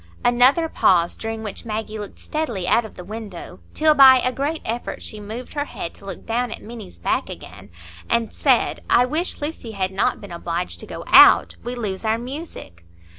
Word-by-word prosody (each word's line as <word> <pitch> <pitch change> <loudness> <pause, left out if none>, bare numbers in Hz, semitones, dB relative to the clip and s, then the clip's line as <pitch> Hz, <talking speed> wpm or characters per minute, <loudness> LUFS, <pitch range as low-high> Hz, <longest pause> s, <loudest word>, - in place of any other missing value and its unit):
Another 255 +7 +4
pause, 175 - +2
during 225 0 -5
which 210 - -5
Maggie 220 -1 -4
looked 205 - -8
steadily 235 - -3
out 235 - +3
of 220 - -12
the 180 - -9
window, 200 - -8 0.2
till 310 0 +4
by 270 -3 +8
a 255 0 0
great 290 +5 -3
effort 235 +2 -4
she 215 - -7
moved 220 +5 -8
her 290 -1 -2
head 170 - -7
to - - -17
look 195 - -8
down 240 +2 -1
at - - -6
Minny's 220 - -10
back 85 - -1
again, - - -11 0.4
and 230 -1 0
said,— - - +2
"I 245 - +5
wish 310 +7 -3
Lucy 290 -7 -5
had 190 -2 -2
not 190 - 0
been 200 - -11
obliged 170 +1 -4
to - - -10
go - - -7
out. - - +7
We 245 +1 -4
lose 205 -5 -4
our 220 0 +1
music." 250 - -8
225 Hz, 195 wpm, -22 LUFS, 195-255 Hz, 0.4 s, by